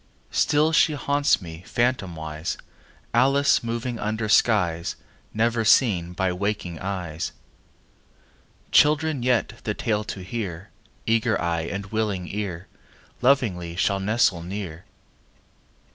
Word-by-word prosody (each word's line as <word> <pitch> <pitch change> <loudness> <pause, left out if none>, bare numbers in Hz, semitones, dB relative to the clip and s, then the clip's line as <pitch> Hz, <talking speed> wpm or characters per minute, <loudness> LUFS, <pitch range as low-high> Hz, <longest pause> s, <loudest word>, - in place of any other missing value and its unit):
Still 150 +2 +3
she 155 -1 +4
haunts 140 -5 +1
me, 80 0 -9
phantomwise, 85 -10 -2 0.6
Alice 135 +4 +4
moving 115 +1 -3
under 110 +1 -2
skies 90 -6 +2 0.4
Never 115 +1 +1
seen 100 -7 +3
by 95 0 0
waking 90 -3 -3
eyes. 90 -5 -4 1.4
Children 150 -1 +4
yet, 120 -2 0
the 105 - -2
tale 105 -3 -1
to 95 - -6
hear, 95 -3 -5 0.3
Eager 115 0 +2
eye 85 -1 -1
and 100 0 -5
willing 105 -5 -1
ear, 95 -4 -4 0.5
Lovingly 105 -11 +2
shall 100 +2 +1
nestle 100 -3 +2
near. 90 -2 -6
105 Hz, 110 wpm, -24 LUFS, 90-120 Hz, 1.4 s, she